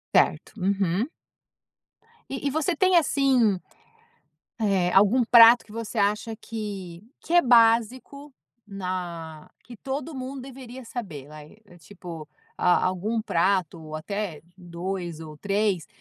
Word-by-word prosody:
Certo. - - +2
Uhum. 195 - 0 1.2
E 270 +1 -3
e - - +2
você 315 +4 0
tem, 370 +3 +3
assim, 265 - +2 1.0
eh, 195 -4 +1
algum 210 +6 +5
prato 235 0 +8
que 210 - -16
você 230 0 -5
acha 210 +2 0
que 200 -6 -7 0.2
que - - -7
é 350 - +7
básico 245 +4 +2 0.3
na 175 -5 -6
que 240 -1 -12
todo 280 +6 -5
mundo 260 +1 -6
deveria 260 -1 -10
saber, 170 - -7
vai, 150 +5 -13 0.2
tipo, 165 -2 -10 0.3
a 180 - +3
algum 200 +5 -1
prato 180 -3 0
ou 155 0 -10
até 185 0 -4
2 175 -1 -5
ou 155 -1 -9
3, 200 -3 -1
205 Hz, 125 wpm, -25 LUFS, 175-245 Hz, 1.2 s, prato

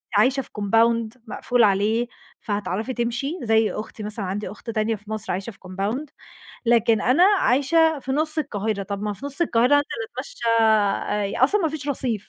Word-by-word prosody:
عايشة 255 +6 +3
في - - -11
compound 230 +3 +2
مقفول 245 +2 +1
عليه، 215 +4 +2 0.3
فهتعرفي 205 +3 -3
تمشي، 240 +8 -2
زي 225 -1 +3
أختي 215 0 -7
مثلًا، 210 -1 -4
عندي 200 +3 -4
أخت 215 +3 -11
تانية 220 0 0
في 210 0 -15
مصر 215 0 -3
عايشة 190 +5 -4
في 195 - -19
compound 200 +10 -3 0.6
لكن 230 -2 +3
أنا 265 +9 +4
عايشة 320 -4 +3
في 265 -1 -4
نُص 310 +2 +1
القاهرة، 215 -7 -2
طَب 200 0 -5
ما 210 0 -1
في 235 +8 -7
نُص 285 +3 -3
القاهرة 250 -4 +3
هانزل 290 0 +3 0.3
اتمشّي - - -7 0.2
آآ، 210 0 +2
أصلًا 410 +10 +2
ما 325 - +1
فيش 300 -2 -6
رصيف 245 -6 -2
230 Hz, 175 wpm, -23 LUFS, 210-270 Hz, 0.6 s, أنا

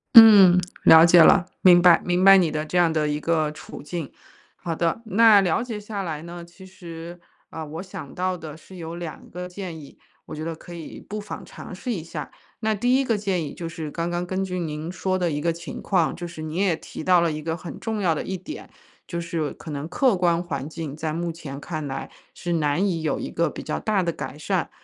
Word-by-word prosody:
嗯， 205 -6 +10 0.2
了 160 0 +9
解 170 0 +7
了， 165 - +6 0.2
明 175 -2 +7
白， 175 -1 +6
明 180 +1 +1
白 195 0 +9
你 175 -4 +3
的 155 0 -3
这 180 - -2
样 170 -2 +4
的 155 -1 0
一 150 0 -1
个 155 -1 0
处 150 - -10
境。 155 -1 -5 0.4
好 170 -2 -4
的， 170 +6 -1
那 220 0 +6
了 180 +3 +1
解 230 -3 -5
下 210 -1 -5
来 160 -4 -5
呢， 170 0 -8
其 170 +3 -15
实， 175 -2 -10 0.3
呃， 160 -1 -6
我 160 +4 -6
想 160 -7 -9
到 185 0 -1
的 155 -2 -9
是 185 +4 -15
有 165 -1 -6
2 170 -2 -8
个 180 +1 -6
建 180 -3 -7
议， 140 -2 -14 0.3
我 - - -8
觉 155 - -5
得 165 0 -4
可 175 +2 -12
以 165 -2 -8
不 210 +1 -5
妨 205 - -8
尝 - - -10
试 245 +6 -4
一 175 -7 -4
下。 165 - -7 0.3
那 220 -1 +1
第 245 +5 +2
一 270 - 0
个 230 -3 +1
建 195 -4 -1
议 145 - -6
就 165 -1 -6
是 160 -2 -6
刚 170 +2 -3
刚 175 0 -2
根 185 +2 -2
据 180 -1 -3
您 160 0 -4
说 185 +2 -1
的 180 -2 0
一 145 - -2
个 170 +3 0
情 170 +1 -8
况， 180 -5 +1
就 175 - -6
是 165 -2 -9
你 155 +1 -5
也 190 -3 +2
提 160 - -9
到 180 0 +5
了 170 -2 +1
一 155 - -5
个 160 0 -2
很 170 +1 -9
重 220 -2 -3
要 170 -4 +2
的 - - -3
一 190 - -4
点， 190 - -8 0.4
就 170 -1 -4
是 165 -3 -3
可 - - -11
能 145 0 -4
客 245 +6 +2
观 170 -1 +2
环 170 -5 -4
境 160 -3 -6
在 155 0 -3
目 170 +1 -2
前 140 -4 -8
看 155 -1 -5
来 135 -1 -5 0.2
是 175 - -4
难 155 +3 +1
以 165 -4 -2
有 155 - -1
一 - - -5
个 170 0 0
比 - - -7
较 155 - -3
大 210 -3 +1
的 170 - 0
改 140 -4 -7
善， 175 +3 -1
170 Hz, 260 characters per minute, -24 LUFS, 160-185 Hz, 0.4 s, 嗯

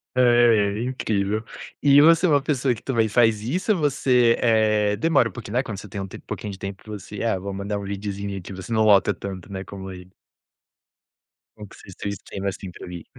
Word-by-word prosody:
É 120 -4 +4
incrível. 110 -4 -1 0.4
E 140 0 +6
você 165 +3 +5
é - - +1
uma 145 -2 +4
pessoa 135 -3 0
que - - -14
também 115 -4 +1
faz 110 -1 +3
isso 170 - -1
ou 190 - -2
você, 125 -5 +3
eh, 110 -3 +2
demora 125 +1 +2
um - - -8
pouquinho, 100 +4 -8
né, 130 - +2
quando 105 -7 -6
você 105 - -10
um 95 - -4
tempo - - -11
um - - -46
pouquinho 105 - -5
de 95 - -11
tempo 100 +1 -7
você, 105 -1 -7
ah, 115 -5 0
vou 100 +2 -5
mandar 100 +1 -3
um - - -7
videozinho 100 0 -4
aqui, 95 +1 -8
você 95 +4 -8
não 110 -1 +3
lota 105 -2 +5
tanto, 100 -1 -7
né, 95 -1 -5
como 95 -1 -9
ele? 90 0 -12 1.4
Bom 105 -1 -10
que - - -16
vocês 95 - -13
tem 100 - -4
streamer, 100 0 -5
assim, 95 -1 -7
pra 90 - -10
ir. 85 -2 -8
105 Hz, 220 wpm, -23 LUFS, 100-120 Hz, 1.4 s, E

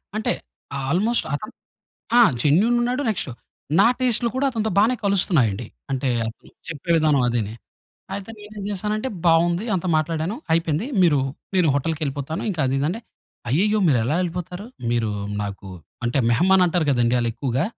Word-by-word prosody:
అంటే 220 - 0 0.6
ఆల్‌మొస్ట్ 210 +10 +1
అతను 180 +9 -4 0.7
ఆ! - - +8 0.2
జెన్యూన్ 195 +12 +4
ఉన్నాడు, 250 +3 0
నెక్స్ట్ 210 -8 -1 0.5
నా 200 - +7 0.2
టేస్ట్లు 240 -1 +2
కూడా 275 +2 +2
అతనితో 220 -3 -1
బానే 220 +5 +4
కలుస్తున్నాయండి. 140 - +2 0.2
అంటే 135 0 -1 0.2
అతను 115 - -9 0.2
చెప్పే 165 +1 -6
విధానం 150 -4 +3
అదీనీ. 110 -3 -1 0.6
అయితే 200 +2 -6
నేనేం 210 0 -9
జేశానంటే 210 +4 -2 0.2
బావుంది. 170 +3 +3
అంత 185 -1 -2
మాట్లాడాను 160 +5 -1 0.2
అయిపోయింది. 165 +4 +1 0.2
మీరు 160 -5 +4 0.4
నేను 180 -4 +3
హోటల్‌కెళ్ళిపోతాను 145 0 -2
ఇంకా 170 -5 -3
అదిదంటే 140 - -1 0.5
అయ్యయ్యో! 205 - +2
మీరు 135 -5 +4
ఎలా 125 - 0
యెళ్ళిపోతారు. 180 +2 -4 0.2
మీరు 115 -2 0 0.3
నాకు 100 -1 -6 0.4
అంటే 120 +3 0
మెహమాన్ 185 +10 +4
అంటారు 175 -1 +1
గదండీ 120 -2 +2
ఆళ్ళు 120 -1 0
ఎక్కువగా. 130 +3 -1
165 Hz, 140 wpm, -22 LUFS, 135-205 Hz, 0.7 s, ఆ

